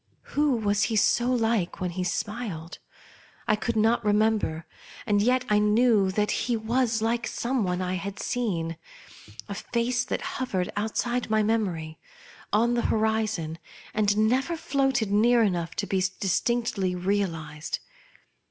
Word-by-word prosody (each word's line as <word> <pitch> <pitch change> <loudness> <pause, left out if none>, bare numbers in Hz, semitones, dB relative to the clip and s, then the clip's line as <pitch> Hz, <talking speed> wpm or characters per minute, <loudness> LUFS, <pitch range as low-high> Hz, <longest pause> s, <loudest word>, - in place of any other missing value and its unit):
Who 290 -2 +3
was 205 -1 +1
he 225 - -1
so 240 +4 +3
like 225 -6 0
when 180 -1 -2
he 180 +1 -3
smiled? 200 -3 -4 0.7
I 215 - +4
could 235 +2 -2
not 225 +2 +3
remember, 210 -6 +1 0.4
and 205 -1 +2
yet 250 +3 +2
1 210 0 +3
knew 225 -5 +4
that 210 +2 0
he 240 -2 0
was 225 0 0
like 235 +1 0
some 245 -1 -1
one 180 0 -1
I 180 0 -2
had 195 +2 -4
seen 170 -10 -2 0.3
— 105 +1 -15
a 200 - -4
face 245 +4 -1
that - - -3 0.2
hovered 190 -8 -1
outside 225 +3 -1
my 215 0 +3
memory, 180 -8 -1 0.5
on 230 +3 +3
the 240 - +1
horizon, 215 -7 0 0.3
and 205 -1 +2
never 265 +8 0
floated 270 -8 0
near 230 +3 +4
enough 175 -5 -1
to 200 - -1
be 190 -2 0 0.2
distinctly 200 -1 0
realized. 170 -5 -2
215 Hz, 145 wpm, -26 LUFS, 185-235 Hz, 0.7 s, I